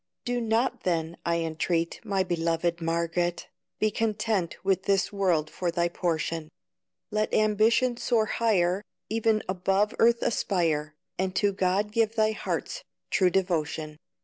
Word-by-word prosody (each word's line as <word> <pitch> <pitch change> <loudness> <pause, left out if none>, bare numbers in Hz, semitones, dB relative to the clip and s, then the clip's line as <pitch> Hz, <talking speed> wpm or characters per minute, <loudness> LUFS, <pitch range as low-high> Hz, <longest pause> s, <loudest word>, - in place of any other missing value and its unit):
Do 245 0 -1
not 230 +3 0
then 165 -2 -1
I 170 0 +1
entreat, 165 +1 -1
My 200 -4 0
beloved 170 -1 -1
Margaret, 170 +1 -1 0.3
Be 215 0 +1
content 215 -5 -1
with 190 -1 +1
this 195 0 +1
world 180 -6 +1
for 180 - -2
thy 170 0 0
portion; 165 -2 -2 0.6
Let 215 0 0
ambition 220 +4 +3
soar 230 -3 +2
higher, 200 -4 +1 0.3
E'en 220 -1 +2
above 195 +3 +1
earth 235 0 +4
aspire, 160 -8 0 0.2
And 185 0 -1
to 205 -1 +2
God 195 +2 0
give 225 0 +1
thy 215 -1 +3
heart's - - -4 0.3
true 185 -2 +4
devotion. 160 -4 -1
190 Hz, 135 wpm, -27 LUFS, 170-215 Hz, 0.6 s, earth